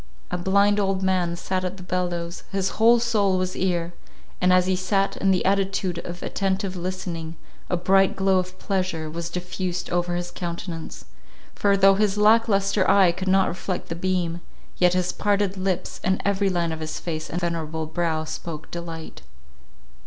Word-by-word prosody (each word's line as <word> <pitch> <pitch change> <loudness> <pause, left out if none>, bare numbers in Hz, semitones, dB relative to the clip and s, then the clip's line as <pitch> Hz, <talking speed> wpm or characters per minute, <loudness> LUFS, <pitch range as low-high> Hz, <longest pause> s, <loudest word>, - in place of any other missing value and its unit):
A - - 0
blind 200 +3 +3
old 195 -1 0
man 180 -2 +1
sat 185 +1 -2
at 185 +1 -3
the 185 - -10
bellows; 175 -1 -3
his 195 -1 0
whole 235 +2 +7
soul 210 -5 +2
was 185 0 -2
ear; 175 -2 -1 0.5
and 180 0 +4
as 185 0 +5
he 185 0 +1
sat 195 +2 0
in 195 - +1
the 185 -2 +2
attitude 195 -2 0
of 175 0 -7
attentive 195 -1 -1
listening, 175 -2 -4 0.3
a 180 - +1
bright 195 +2 +3
glow 190 -1 +3
of 185 0 -5
pleasure 185 -5 -2
was 170 +1 -4
diffused 180 +1 -4
over 175 0 0
his 175 0 -4
countenance; 170 -1 -6 0.5
for, 200 -1 +2
though 195 0 +6
his 205 0 +1
lack 220 +2 +5
lustre 195 -1 +2
eye 190 -3 +6
could 185 +2 -6
not 190 0 +4
reflect 180 +1 -4
the 165 - -3
beam, 175 -1 -1 0.4
yet 180 0 +4
his 180 -1 +1
parted 200 -2 0
lips, 185 -1 -2
and 190 0 +1
every 200 0 +2
line 170 -2 0
of 160 - -4
his 155 0 -4
face 155 -2 -4
and 175 - -2
venerable 160 -2 -2
brow 160 0 -1
spoke 160 0 -7
delight. 165 -2 -7
185 Hz, 175 wpm, -24 LUFS, 175-195 Hz, 0.5 s, whole